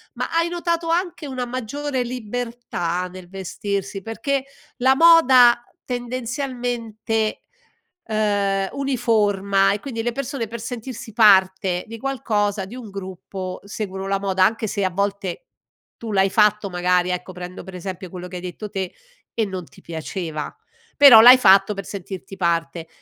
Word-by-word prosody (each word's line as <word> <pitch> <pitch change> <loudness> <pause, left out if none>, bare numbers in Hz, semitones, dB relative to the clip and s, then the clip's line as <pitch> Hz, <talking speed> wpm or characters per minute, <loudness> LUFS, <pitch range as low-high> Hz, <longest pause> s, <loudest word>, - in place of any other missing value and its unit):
ma - - -3
hai 335 +1 +2
notato 340 -1 -2
anche 345 -2 -1
una 255 -2 -3
maggiore 255 +2 -3
libertà 235 -7 -4
nel 180 -1 -12
vestirsi, 195 +1 -4
perché 265 +6 -2 0.3
la 260 +1 +4
moda 260 -8 +7 0.2
tendenzialmente, 240 -3 -3 0.6
ehm, 205 -3 0
uniforma 210 -7 +1
e 205 - -1
quindi 230 -2 -5
le 240 - 0
persone 245 -1 -4
per 235 +1 -6
sentirsi 230 0 -7
parte 190 -4 +4
di 230 +1 -8
qualcosa, 215 -6 -1
di 205 +6 -10
un 245 -4 -9
gruppo 190 -1 -7
seguono 195 -2 -5
la 195 0 0
moda 190 -1 +1
anche 220 +3 +1
se 200 -1 -2
a 190 - +2
volte 200 -1 -3 0.5
tu 230 -2 -6
l'hai 195 -1 +3
fatto 210 0 +3
magari 180 0 +1
ecco 180 +1 -3
prendo 180 +1 -8
per 190 - -11
esempio 185 0 -6
quello 180 -1 -7
che 180 - -10
hai 180 - -5
detto 185 +4 -6
te 190 -3 -4 0.4
e 225 - 0
non 185 -3 -6
ti - - -19
piaceva, 160 -1 -5 0.4
però 265 -6 +10
l'hai 250 +3 +10
fatto 195 -2 +5
per 195 -2 -7
sentirti 195 0 -8
parte. 165 -2 -1
210 Hz, 150 wpm, -22 LUFS, 190-245 Hz, 0.6 s, però